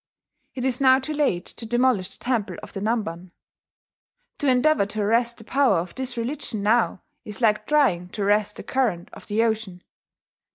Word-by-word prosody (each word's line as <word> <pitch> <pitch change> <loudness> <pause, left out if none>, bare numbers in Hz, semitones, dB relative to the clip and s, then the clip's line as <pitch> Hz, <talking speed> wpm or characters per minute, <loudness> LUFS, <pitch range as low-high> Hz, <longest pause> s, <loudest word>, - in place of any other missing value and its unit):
'It 255 -1 -3
is 260 0 0
now 260 -1 +6
too 270 +3 -4
late 275 -13 0
to - - -7
demolish 240 -4 +1
the - - -12
Temple 225 -7 -2
of - - -10
the - - -4
Namban. 195 -5 -2 1.1
To 290 - 0
endeavour 255 -3 +3
to 210 +1 -3
arrest 235 +3 +1
the 225 - -12
power 270 +1 +2
of 170 +1 -4
this 260 -2 -4
religion 230 -3 -3
now 220 -1 +2 0.2
is 210 -2 -6
like 215 -3 +2
trying 205 -13 +2
to 205 - -4
arrest 210 +1 +2
the - - -8
current 225 -10 -1
of - - -12
the 220 +2 +1
ocean. 220 -5 -2
225 Hz, 180 wpm, -24 LUFS, 200-260 Hz, 1.1 s, now